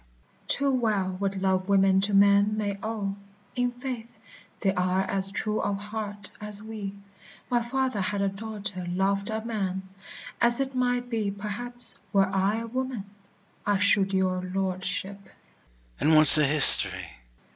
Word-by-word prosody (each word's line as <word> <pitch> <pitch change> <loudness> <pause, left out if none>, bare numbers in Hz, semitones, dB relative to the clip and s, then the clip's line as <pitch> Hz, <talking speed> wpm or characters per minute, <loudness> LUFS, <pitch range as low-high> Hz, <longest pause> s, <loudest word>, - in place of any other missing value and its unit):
VIOLA. - - -35
Too 280 0 +3
well 210 -7 0
what 200 0 -2
love 190 0 0
women 195 -1 +4
to 205 +1 -1
men 200 +1 +4
may 205 -2 -2
owe: 205 -3 -4 0.4
In 245 0 +1
faith, 245 -2 -7 0.4
they 195 - +1
are 185 0 0
as 195 0 -2
true 210 +1 -2
of 200 -1 -1
heart 205 0 -6
as 210 0 -4
we. 210 -3 -7 0.6
My 240 -1 +2
father 255 -2 -2
had 200 +2 -2
a - - +1
daughter 200 -2 -4
loved 195 +3 -1
a 220 0 -4
man, 190 -4 -3 0.5
As 240 +1 +4
it 270 0 -2
might 245 -1 0
be, 225 -4 -2
perhaps, 225 +5 -4 0.2
were 195 -1 +4
I 195 +3 0
a - - -5
woman, 255 -3 -4 0.6
I 205 -1 +1
should 200 -1 +2
your 185 -1 0
lordship. 190 +1 -2
200 Hz, 140 wpm, -26 LUFS, 195-225 Hz, 0.6 s, women